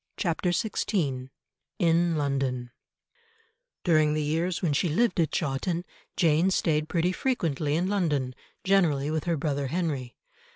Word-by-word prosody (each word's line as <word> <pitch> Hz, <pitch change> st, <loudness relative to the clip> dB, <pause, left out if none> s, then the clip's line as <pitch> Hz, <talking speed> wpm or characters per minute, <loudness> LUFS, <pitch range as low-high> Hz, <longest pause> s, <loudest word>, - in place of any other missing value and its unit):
CHAPTER 175 Hz, 0 st, 0 dB
XVI 160 Hz, -, -1 dB, 0.5 s
IN 170 Hz, 0 st, +3 dB
LONDON 135 Hz, -4 st, -1 dB, 1.1 s
During 155 Hz, -3 st, +3 dB
the 155 Hz, -, 0 dB
years 165 Hz, +5 st, -1 dB
when 160 Hz, -4 st, +2 dB
she 165 Hz, +5 st, +1 dB
lived 215 Hz, +5 st, +1 dB
at 160 Hz, -, +3 dB
Chawton, 165 Hz, +4 st, -1 dB, 0.3 s
Jane 165 Hz, +1 st, +3 dB
stayed 155 Hz, -4 st, +1 dB
pretty 175 Hz, +1 st, +1 dB
frequently 160 Hz, -, -1 dB
in 175 Hz, +3 st, +1 dB
London, 150 Hz, -10 st, 0 dB, 0.3 s
generally 160 Hz, -7 st, +2 dB
with 155 Hz, -1 st, -2 dB
her 170 Hz, -2 st, +1 dB
brother 140 Hz, -2 st, -1 dB
Henry. 140 Hz, -6 st, -3 dB
160 Hz, 130 wpm, -27 LUFS, 145-175 Hz, 1.1 s, IN